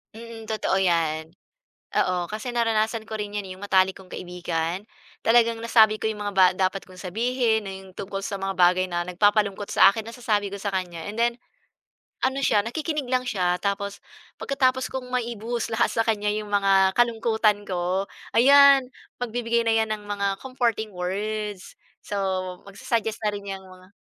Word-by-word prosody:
Mm 230 Hz, -1 st, -10 dB
totoo 215 Hz, -3 st, 0 dB
yan, 165 Hz, -4 st, +1 dB, 0.7 s
oo, 180 Hz, -1 st, +1 dB
kasi 220 Hz, +4 st, -4 dB
naranasan 225 Hz, -1 st, +1 dB
ko 220 Hz, -, -5 dB
rin 205 Hz, 0 st, -5 dB
yan 205 Hz, -, -2 dB
eh -, -, -8 dB
yung 190 Hz, -, -12 dB
matalik 190 Hz, 0 st, +4 dB
kong 190 Hz, -, -14 dB
kaibigan, 175 Hz, +1 st, -3 dB, 0.4 s
talagang 230 Hz, 0 st, +4 dB
nasabi 220 Hz, -2 st, +4 dB
ko -, -, -1 dB
yung 210 Hz, -1 st, -3 dB
mga 205 Hz, -, -2 dB
ba 190 Hz, -1 st, +7 dB
dapat 190 Hz, +1 st, 0 dB
kong 185 Hz, 0 st, -14 dB
sabihin 225 Hz, +2 st, 0 dB
na -, -, -5 dB
yung 190 Hz, 0 st, -12 dB
tungkol 195 Hz, 0 st, -5 dB
sa 200 Hz, -1 st, -4 dB
mga 195 Hz, -1 st, -3 dB
bagay 180 Hz, +1 st, +4 dB
na 175 Hz, -1 st, -2 dB
nagpapalungkot 205 Hz, +2 st, +1 dB
sa 195 Hz, -, +7 dB
akin, 220 Hz, +1 st, -6 dB
nasasabi 225 Hz, -4 st, -1 dB
ko 200 Hz, -, -5 dB
sa 200 Hz, 0 st, -3 dB
kanya. 175 Hz, -3 st, -4 dB
And 215 Hz, -, -10 dB
then, 235 Hz, 0 st, +3 dB, 0.9 s
ano 265 Hz, +1 st, +1 dB
siya 210 Hz, -6 st, +3 dB
nakikinig 300 Hz, +3 st, -3 dB
lang 255 Hz, -1 st, +1 dB
siya. 180 Hz, -6 st, +1 dB
Tapos 200 Hz, 0 st, -2 dB, 0.4 s
pagkatapos 260 Hz, -2 st, +1 dB
kong 260 Hz, -1 st, -4 dB
maibuhos 235 Hz, -1 st, -2 dB
lahat 235 Hz, +1 st, +2 dB
sa 225 Hz, -, +2 dB
kanya 210 Hz, -2 st, +1 dB
yung 210 Hz, -1 st, -4 dB
mga 195 Hz, -1 st, +3 dB
kalungkutan 220 Hz, -3 st, +2 dB
ko, 185 Hz, +1 st, -1 dB, 0.3 s
ayan 275 Hz, +1 st, +7 dB, 0.3 s
magbibigay 235 Hz, 0 st, 0 dB
na 225 Hz, -, +4 dB
'yan 220 Hz, -1 st, +1 dB
ng 210 Hz, -, -6 dB
mga 200 Hz, -1 st, -1 dB
comforting 240 Hz, -4 st, -1 dB
words. 205 Hz, +2 st, -4 dB, 0.3 s
So 205 Hz, -, -5 dB, 0.5 s
magsa-suggest 225 Hz, +1 st, -2 dB
na 210 Hz, -, +2 dB
rin 200 Hz, -1 st, -7 dB
'yang 195 Hz, -1 st, -5 dB
mga 185 Hz, 0 st, -15 dB
210 Hz, 170 wpm, -25 LUFS, 190-230 Hz, 0.9 s, ba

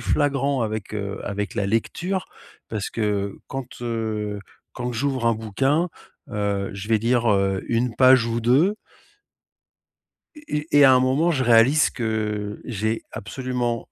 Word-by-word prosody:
flagrant, 140 Hz, -3 st, +1 dB
avec, 110 Hz, -1 st, -4 dB
heu, 100 Hz, -1 st, -4 dB
avec 100 Hz, -1 st, -4 dB
la 100 Hz, -, 0 dB
lecture 175 Hz, -, -1 dB, 0.5 s
parce 105 Hz, -3 st, -3 dB
que 100 Hz, -3 st, -2 dB
quand, 135 Hz, -3 st, -5 dB, 0.2 s
heu, 110 Hz, -3 st, -3 dB, 0.3 s
quand 125 Hz, 0 st, -4 dB
j'ouvre 130 Hz, 0 st, -1 dB
un 115 Hz, -, +4 dB
bouquin, 135 Hz, -, 0 dB, 0.4 s
heu, 100 Hz, -1 st, -1 dB
je 100 Hz, +1 st, -7 dB
vais 115 Hz, -, +4 dB
lire, 115 Hz, +1 st, +2 dB
heu, 95 Hz, -1 st, +1 dB
1 120 Hz, 0 st, 0 dB
page 130 Hz, -1 st, +6 dB
ou 115 Hz, 0 st, -1 dB
2 140 Hz, -, +3 dB, 1.6 s
et 300 Hz, -, -12 dB, 0.3 s
et 145 Hz, -, +6 dB
et 145 Hz, -, +8 dB
à 130 Hz, -, +8 dB
un 125 Hz, -, +4 dB
moment 135 Hz, +7 st, +2 dB
je 135 Hz, -5 st, 0 dB
réalise 120 Hz, +6 st, +5 dB
que 105 Hz, -3 st, -3 dB
j'ai 110 Hz, -1 st, -2 dB
absolument 120 Hz, 0 st, -3 dB
115 Hz, 145 wpm, -23 LUFS, 105-130 Hz, 1.6 s, et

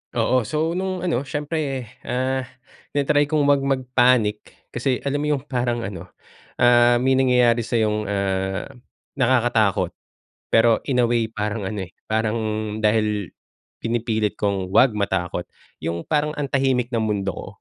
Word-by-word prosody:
Oo, 125 Hz, -4 st, +1 dB
so 155 Hz, +4 st, 0 dB
nung 185 Hz, 0 st, -3 dB
ano 140 Hz, -6 st, -1 dB
siyempre, 150 Hz, -3 st, -2 dB, 0.2 s
ah, 130 Hz, +1 st, -1 dB, 0.5 s
tina 145 Hz, -, +2 dB
try 145 Hz, 0 st, +2 dB
kung 150 Hz, -1 st, +1 dB
wag 140 Hz, -1 st, +4 dB
mag 135 Hz, -1 st, 0 dB
panic, 120 Hz, -5 st, +3 dB, 0.3 s
kasi 125 Hz, +1 st, -1 dB
alam 140 Hz, +1 st, -1 dB
mo 150 Hz, 0 st, +1 dB
yung 135 Hz, -, -6 dB
parang 120 Hz, -3 st, -1 dB
ano, 90 Hz, -4 st, -6 dB, 0.5 s
ah, 120 Hz, 0 st, +5 dB
may 130 Hz, +2 st, +2 dB
nangyayari 125 Hz, -2 st, +4 dB
sayong 110 Hz, -2 st, 0 dB
ah, 95 Hz, -1 st, -2 dB, 0.5 s
nakakatakot. 120 Hz, -5 st, +2 dB, 0.6 s
Pero 115 Hz, 0 st, +5 dB
in 125 Hz, -3 st, +2 dB
a 120 Hz, -, +2 dB
way 120 Hz, -1 st, +2 dB
parang 105 Hz, -1 st, -3 dB
ano 95 Hz, -2 st, -4 dB
eh, -, -, -33 dB
parang 110 Hz, +1 st, 0 dB, 0.5 s
dahil 105 Hz, -3 st, +1 dB, 0.5 s
pinipilit 115 Hz, -2 st, -1 dB
kong 100 Hz, -2 st, -1 dB
wag 120 Hz, +3 st, +5 dB
matakot, 95 Hz, -4 st, -2 dB, 0.3 s
yung 85 Hz, 0 st, -3 dB
parang 150 Hz, 0 st, 0 dB
ang 145 Hz, -, -1 dB
tahimik 130 Hz, -2 st, 0 dB
ng 115 Hz, -, +1 dB
mundo 100 Hz, -3 st, -1 dB
ko, -, -, -8 dB
120 Hz, 150 wpm, -22 LUFS, 105-135 Hz, 0.6 s, ah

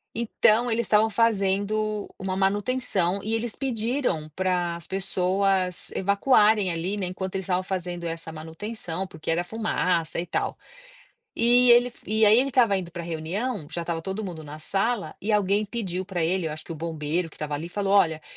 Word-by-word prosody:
então 235 Hz, +1 st, +3 dB
eles 225 Hz, 0 st, 0 dB
estavam 215 Hz, +1 st, +4 dB
fazendo 210 Hz, -1 st, +1 dB
uma 190 Hz, -1 st, -2 dB
manutenção 195 Hz, -1 st, +1 dB
e 220 Hz, +2 st, 0 dB
eles 225 Hz, 0 st, -2 dB
pediram 230 Hz, -, -1 dB
para 180 Hz, -2 st, 0 dB
as 170 Hz, -2 st, -9 dB
pessoas 190 Hz, -1 st, 0 dB
evacuarem 205 Hz, -1 st, +3 dB
ali, 170 Hz, +4 st, -2 dB
enquanto 185 Hz, +1 st, -5 dB
eles 190 Hz, -, -3 dB
estavam 180 Hz, 0 st, +1 dB
fazendo 180 Hz, -2 st, -4 dB
essa 165 Hz, 0 st, -4 dB
manutenção, 165 Hz, +3 st, -5 dB
porque 160 Hz, -3 st, -8 dB
era 170 Hz, +2 st, +1 dB
fumaça 180 Hz, -6 st, -1 dB
e 170 Hz, -, -2 dB
tal, 175 Hz, -, -2 dB, 0.8 s
e 245 Hz, +1 st, +5 dB
ele 245 Hz, +1 st, +4 dB
e 220 Hz, +1 st, +3 dB
aí 215 Hz, +3 st, +7 dB
ele 270 Hz, -, +2 dB
estava 240 Hz, -7 st, +3 dB
indo 175 Hz, -2 st, -6 dB
para 170 Hz, 0 st, -6 dB
reunião, 170 Hz, -, -3 dB
já 170 Hz, -, -3 dB
estava 170 Hz, -1 st, -3 dB
todo 195 Hz, +4 st, -3 dB
mundo 170 Hz, -4 st, -6 dB
na 150 Hz, +1 st, -8 dB
sala, 200 Hz, +7 st, -1 dB
e 210 Hz, -, -2 dB
alguém 205 Hz, 0 st, +2 dB
pediu 195 Hz, -5 st, -3 dB
para 180 Hz, -4 st, -1 dB
ele, 180 Hz, +1 st, 0 dB
eu 155 Hz, -, -3 dB
acho 155 Hz, 0 st, -8 dB
que -, -, -7 dB
o -, -, -6 dB
bombeiro 160 Hz, +1 st, -2 dB
que -, -, -17 dB
estava 150 Hz, -1 st, -5 dB
ali 155 Hz, +4 st, -4 dB
falou: 195 Hz, +2 st, -1 dB
"Olha, 160 Hz, -6 st, +3 dB
190 Hz, 180 wpm, -25 LUFS, 170-215 Hz, 0.8 s, aí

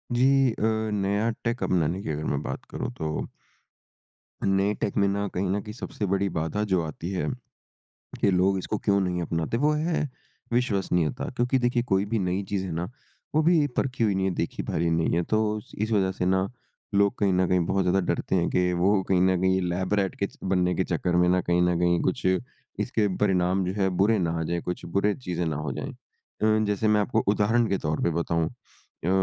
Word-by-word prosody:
जी। 135 Hz, +1 st, +4 dB
अ, -, -, -8 dB, 0.4 s
नया 100 Hz, +3 st, +1 dB
टेक 120 Hz, +1 st, -1 dB
अपनाने 85 Hz, +1 st, +1 dB
की -, -, -5 dB
अगर 75 Hz, +1 st, -3 dB
मैं 70 Hz, -, -1 dB
बात 65 Hz, -, -5 dB
करूँ -, -, -4 dB
तो 75 Hz, -1 st, -3 dB, 1.2 s
नए 95 Hz, +1 st, +2 dB
टेक 100 Hz, -, -1 dB
में 100 Hz, -, +4 dB
ना 100 Hz, +1 st, -1 dB
कहीं 90 Hz, +1 st, -1 dB
न 100 Hz, +2 st, +1 dB
कहीं 105 Hz, +1 st, -8 dB
सबसे 125 Hz, -2 st, -5 dB
बड़ी 100 Hz, +1 st, +1 dB
बाधा 80 Hz, +7 st, -1 dB
जो 90 Hz, -2 st, +3 dB
आती 80 Hz, +2 st, -5 dB
है 95 Hz, -, -1 dB, 0.9 s
कि 100 Hz, -, +4 dB
लोग 95 Hz, +1 st, +3 dB
इसको 100 Hz, +3 st, -2 dB
क्यों 100 Hz, 0 st, +2 dB
नहीं 90 Hz, -1 st, -1 dB
अपनाते, 85 Hz, +5 st, -1 dB
वो 145 Hz, +4 st, +3 dB
है 155 Hz, -1 st, 0 dB, 0.4 s
विश्वसनीयता। 100 Hz, -4 st, 0 dB
क्योंकि 125 Hz, +2 st, +2 dB
देखिए 120 Hz, -1 st, +1 dB
कोई 95 Hz, -1 st, +2 dB
भी 110 Hz, +1 st, -1 dB
नई 90 Hz, +1 st, 0 dB
चीज़ 100 Hz, -2 st, -1 dB
है 90 Hz, -, -4 dB
ना 85 Hz, +2 st, -2 dB, 0.5 s
वो 155 Hz, -, +5 dB
अभी 160 Hz, -2 st, +4 dB
परखी 130 Hz, -3 st, 0 dB
हुई 105 Hz, -3 st, +2 dB
नहीं 95 Hz, -, 0 dB
है, -, -, 0 dB
देखी -, -, -2 dB
भाली 85 Hz, +1 st, 0 dB
नहीं 80 Hz, 0 st, +1 dB
है। 85 Hz, -, +2 dB
तो 110 Hz, +2 st, 0 dB, 0.2 s
इस 110 Hz, +2 st, -1 dB
वज़ह 95 Hz, -3 st, +2 dB
से 90 Hz, -, -3 dB
ना 95 Hz, +1 st, +2 dB, 0.5 s
लोग 100 Hz, +3 st, +3 dB
कहीं 100 Hz, -2 st, +2 dB
न 90 Hz, 0 st, +2 dB
कहीं 90 Hz, -, +3 dB
बहुत 95 Hz, +2 st, +1 dB
ज़्यादा 90 Hz, +2 st, +2 dB
डरते -, -, -2 dB
हैं 85 Hz, -2 st, +2 dB
कि 90 Hz, 0 st, +2 dB
वो 95 Hz, +3 st, +3 dB
कहीं 90 Hz, -2 st, +3 dB
न 95 Hz, -1 st, +3 dB
कहीं 95 Hz, 0 st, +2 dB
लैब 90 Hz, +3 st, -1 dB
रैट 100 Hz, -2 st, +1 dB
के 100 Hz, -, +2 dB
च -, -, -21 dB
बनने 90 Hz, -1 st, +1 dB
के 95 Hz, -, +1 dB
चक्कर 90 Hz, 0 st, -1 dB
में 90 Hz, 0 st, +4 dB
ना 90 Hz, 0 st, +3 dB
कहीं 90 Hz, 0 st, +1 dB
न 90 Hz, -1 st, +2 dB
कहीं 85 Hz, 0 st, +3 dB
कुछ 95 Hz, -, -1 dB, 0.5 s
इसके 110 Hz, -4 st, +1 dB
परिणाम 95 Hz, -1 st, +2 dB
जो 90 Hz, -, -2 dB
हैं 95 Hz, -, +3 dB
बुरे 110 Hz, +3 st, +4 dB
ना 85 Hz, -3 st, 0 dB
आ -, -, -1 dB
जाएँ, 85 Hz, +2 st, -2 dB
कुछ 90 Hz, -, -5 dB
बुरे 100 Hz, +3 st, +1 dB
चीज़ें 90 Hz, -8 st, -3 dB
ना 80 Hz, -2 st, -1 dB
हो 75 Hz, -1 st, -3 dB
जाएँ। -, -, -5 dB
अ, 110 Hz, 0 st, -2 dB
जैसे 105 Hz, +1 st, 0 dB
मैं 105 Hz, -1 st, +4 dB
आपको 110 Hz, +2 st, +1 dB
उदाहरण 110 Hz, +3 st, +2 dB
के 100 Hz, -, +1 dB
तौर 75 Hz, -2 st, -2 dB
पे -, -, +3 dB
बताऊँ 85 Hz, -1 st, 0 dB
अ, 115 Hz, -7 st, -10 dB
95 Hz, 220 wpm, -26 LUFS, 90-105 Hz, 1.2 s, वो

